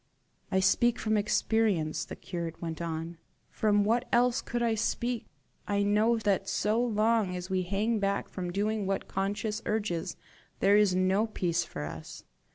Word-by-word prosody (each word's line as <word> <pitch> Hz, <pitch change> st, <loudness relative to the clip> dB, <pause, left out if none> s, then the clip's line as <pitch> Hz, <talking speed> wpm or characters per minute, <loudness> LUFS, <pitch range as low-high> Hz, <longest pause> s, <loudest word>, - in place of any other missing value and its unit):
"I 190 Hz, -, +3 dB
speak 230 Hz, +5 st, +3 dB
from 215 Hz, 0 st, 0 dB
experience," 210 Hz, -5 st, +1 dB
the -, -, -7 dB
curate 170 Hz, -3 st, -5 dB
went 165 Hz, -1 st, -5 dB
on 165 Hz, 0 st, -4 dB, 0.3 s
"from 205 Hz, -1 st, +2 dB
what 235 Hz, +4 st, +1 dB
else 245 Hz, 0 st, +3 dB
could 240 Hz, 0 st, -2 dB
I 230 Hz, -1 st, +2 dB
speak? 235 Hz, +2 st, -1 dB, 0.4 s
I 205 Hz, 0 st, +1 dB
know 215 Hz, +3 st, +3 dB
that 200 Hz, -3 st, 0 dB
so 215 Hz, +3 st, +1 dB
long 220 Hz, -4 st, +1 dB
as 180 Hz, +1 st, -6 dB
we 185 Hz, -1 st, +1 dB
hang 205 Hz, +5 st, 0 dB
back 200 Hz, 0 st, 0 dB
from 180 Hz, -2 st, -5 dB
doing 205 Hz, +1 st, -1 dB
what 195 Hz, 0 st, -1 dB
conscience 205 Hz, +3 st, -2 dB
urges, 205 Hz, -6 st, -2 dB, 0.4 s
there 200 Hz, +1 st, +5 dB
is 205 Hz, -3 st, +4 dB
no 190 Hz, +4 st, +2 dB
peace 175 Hz, -5 st, 0 dB
for 115 Hz, -, -6 dB
us. 80 Hz, +1 st, -8 dB
205 Hz, 165 wpm, -29 LUFS, 185-220 Hz, 0.4 s, there